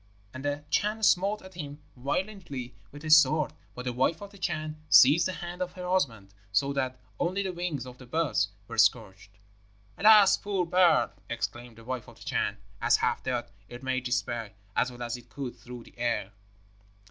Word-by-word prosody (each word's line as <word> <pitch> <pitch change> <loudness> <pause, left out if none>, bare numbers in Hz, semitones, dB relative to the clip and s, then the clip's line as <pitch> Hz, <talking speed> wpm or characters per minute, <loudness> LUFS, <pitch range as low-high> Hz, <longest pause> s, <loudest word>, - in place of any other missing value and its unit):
And 130 +1 -7
the 145 0 -2
Chan 215 +2 +1
smote 200 +2 +3
at 190 0 -12
him 145 -4 -7 0.2
violently 140 - -4 0.2
with 145 +2 -11
his 155 0 +7
sword; 155 -1 +4 0.2
but 125 - -7
the 125 - -1
wife 130 +7 +1
of 200 0 -9
the 200 - -15
Chan 155 -3 -3
seized 150 +7 +7
the - - -2
hand 175 0 -7
of 180 -1 -2
her 180 -1 -6
husband, 115 - -1 0.2
so 140 +8 +2
that 130 -2 -2 0.2
only 185 +3 0
the 190 -1 -3
wings 170 -7 -3
of 125 0 -11
the 125 - -12
bird 160 +3 -1 0.3
were - - -4
scorched. 100 -4 +2 0.7
'Alas, 210 -2 +7
poor 195 -3 -1
bird!' 180 -1 +4 0.2
exclaimed 120 +1 -4
the 115 - -13
wife 125 -1 -5
of - - -14
the - - -13
Chan, - - -1 0.2
as, - - +4
half - - 0
dead, - - -3 0.2
it 120 +2 -10
made 130 -1 -1
its 125 +1 +1
way, 115 -3 -5 0.2
as 125 - +2
well 120 0 -7
as 120 +1 -3
it 120 0 -16
could, 135 -2 -6
through 125 -1 -10
the - - -18
air. 115 -4 -1
140 Hz, 195 wpm, -28 LUFS, 120-180 Hz, 0.7 s, his